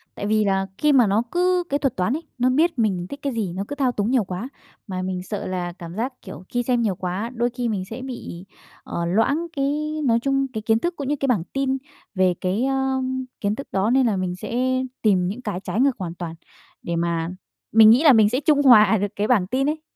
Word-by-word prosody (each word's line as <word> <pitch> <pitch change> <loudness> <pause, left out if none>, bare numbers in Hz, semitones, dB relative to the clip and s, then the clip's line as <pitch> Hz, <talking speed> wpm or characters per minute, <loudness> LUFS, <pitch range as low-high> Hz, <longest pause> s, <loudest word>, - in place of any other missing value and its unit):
Tại - - -5
vì 215 0 +2
là 195 -1 +1
khi 300 -1 +3
mà 245 -6 +5
nó 210 +4 +2
cứ 360 0 +2
cái 285 - 0
thuật 270 -5 0
toán 185 +6 0
ấy, 315 +3 -3
nó 250 +1 +2
biết 310 +2 +2
mình 190 -6 0
thích 280 - -7
cái 280 -2 -2
gì, 205 -7 -2
nó 195 - -2
cứ 285 - -5
thao 270 -3 +1
túng 215 0 -1
nhiều 255 -4 +3
quá. 185 +6 -5 0.4
Mà 185 -2 -4
mình 185 -1 -3
sợ 205 +2 -5
là 180 -1 -3
cảm 170 -1 -8
giác, 245 +5 -2
kiểu, 185 -2 -10
khi 245 0 -1
xem 245 -1 +1
nhiều 210 -5 0
quá, 185 +5 -3
đôi 240 0 0
khi 245 -1 -2
mình 200 -4 -2
sẽ 230 +3 -6
bị, 240 -9 -7 0.4
ờ, 170 - -3
loãng 245 - +1
cái 295 +2 -1
nói 230 -1 +3
chung 275 +1 0
cái 220 - -3
kiến 225 +1 +2
thức 345 +7 -2
cũng 280 -4 -5
như 295 - +1
cái 275 - 0
bảng 215 -10 +1
tin 270 -1 0 0.4
về 185 -1 +3
cái, 195 +7 0
ơ, 265 -1 0 0.4
kiến 205 +1 0
thức 275 - -7
đó, 195 +3 +1
nên 260 +1 +3
là 215 - +1
mình 180 -1 -2
sẽ 255 +6 -1 0.2
tìm 185 -5 +3
những 220 +7 -5
cái 210 -6 -4
trái 215 - -3
ngược 275 -2 +2
hoàn 170 -2 -4
toàn 170 -2 -6 0.5
để 170 - -2
mà 170 -1 -1 0.4
mình 220 0 +8
nghĩ 240 +7 +6
là 295 -5 +8
mình 215 -2 +5
sẽ 250 +4 0
trung 290 0 +3
hòa 220 -6 +7
được 205 +1 0
cái 210 +1 -1
bảng 205 -8 +3
tin 270 +7 0
ấy. 310 0 -3
225 Hz, 250 wpm, -23 LUFS, 190-270 Hz, 0.5 s, mình